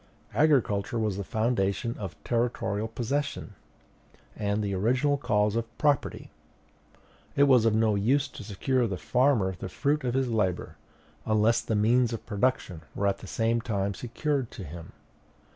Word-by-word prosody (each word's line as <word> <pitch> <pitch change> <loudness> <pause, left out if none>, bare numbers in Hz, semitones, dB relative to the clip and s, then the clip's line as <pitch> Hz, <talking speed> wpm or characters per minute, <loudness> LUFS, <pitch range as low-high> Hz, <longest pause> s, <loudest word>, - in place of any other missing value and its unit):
Agriculture 120 -8 +2
was 110 -3 0
the 100 - -3
foundation 110 +1 0
of 95 -4 -5
territorial 115 -3 -1
possession, 125 +1 -3 0.8
and 105 0 -1
the 100 -1 -2
original 125 +9 +2
cause 105 -6 +1
of 115 0 -4
property. 145 -3 0 1.0
It 140 - +5
was 130 -5 +5
of 110 -1 +3
no 110 -1 +3
use 125 +8 +2
to 135 - -10
secure 120 +6 -1
to 120 - +2
the 95 -3 -3
farmer 105 - +2
the 95 - -5
fruit 145 +9 0
of 125 -1 -1
his 135 -2 +1
labor, 100 -6 -1 0.5
unless 110 +1 +3
the 110 - -2
means 115 +3 +3
of 115 - -6
production 105 -6 -1
were 100 - -1
at 100 0 +1
the - - -10
same 115 +1 0
time 100 -4 -1
secured 130 - -2
to 100 - -9
him. 85 +1 -9
115 Hz, 160 wpm, -28 LUFS, 100-125 Hz, 1.0 s, It